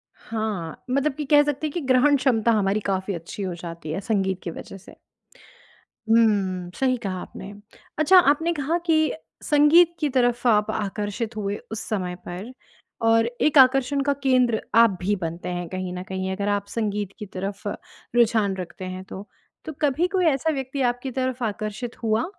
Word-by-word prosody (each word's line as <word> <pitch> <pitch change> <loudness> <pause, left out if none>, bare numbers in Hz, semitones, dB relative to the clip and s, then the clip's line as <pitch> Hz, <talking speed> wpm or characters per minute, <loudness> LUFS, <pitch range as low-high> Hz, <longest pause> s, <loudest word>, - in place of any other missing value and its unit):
हाँ। 215 -8 -5
मतलब 275 +3 +1
कि 300 0 -4
कह 290 +1 +6
सकते 295 +1 -2
हैं - - -6
कि 345 - -2
ग्रहण 265 +2 +4
क्षमता 235 -3 +2
हमारी 205 -1 +2
काफ़ी 195 0 -1
अच्छी 170 +4 -6
हो 185 - -3
जाती 165 -2 -7
है 170 - -2
संगीत 190 -3 0
की 170 - -4
वज़ह 195 - -9
से। 195 - -15 1.2
हुँ। 195 -6 +2
सही 255 -1 +1
कहा 190 -5 -4
आपने। 195 +1 -9 0.5
अच्छा 365 +5 +6
आपने 320 +1 +3
कहा 300 +4 0
कि 315 -1 +3 0.3
संगीत 315 +4 +5
की 300 - +1
तरफ़ 245 -1 +1
आप 210 -2 +3
आकर्षित 210 +2 -3
हुए 205 -1 -2 0.2
उस 220 - -3
समय 185 -4 -2
पर 185 +8 -7 0.5
और 225 0 +4 0.2
एक 300 -1 +4
आकर्षण 270 +1 +5
का 285 +1 +1
केंद्र 250 -4 +3 0.2
आप 230 -1 +7
भी 205 +3 +1
बनते 170 0 -5
हैं 175 -1 -4
कहीं 185 0 -4
ना 180 - -5
कहीं 190 0 -3
अगर 200 +1 -2
आप 200 0 0
संगीत 205 -3 -2
की 210 - -6
तरफ़ 195 +2 -5 0.5
रुझान 220 -5 +3
रखते 185 +1 -7
हैं 185 0 -6
तो। 195 +2 -9 0.4
तो 315 - -5
कभी 295 +5 +2
कोई 370 -2 +1
ऐसा 310 +1 +2
व्यक्ति 270 +1 -4
आपकी 245 +2 -1
तरफ़ 255 -1 -1
आकर्षित 215 +3 -4
हुआ 220 +1 +1
220 Hz, 175 wpm, -24 LUFS, 195-270 Hz, 1.2 s, आप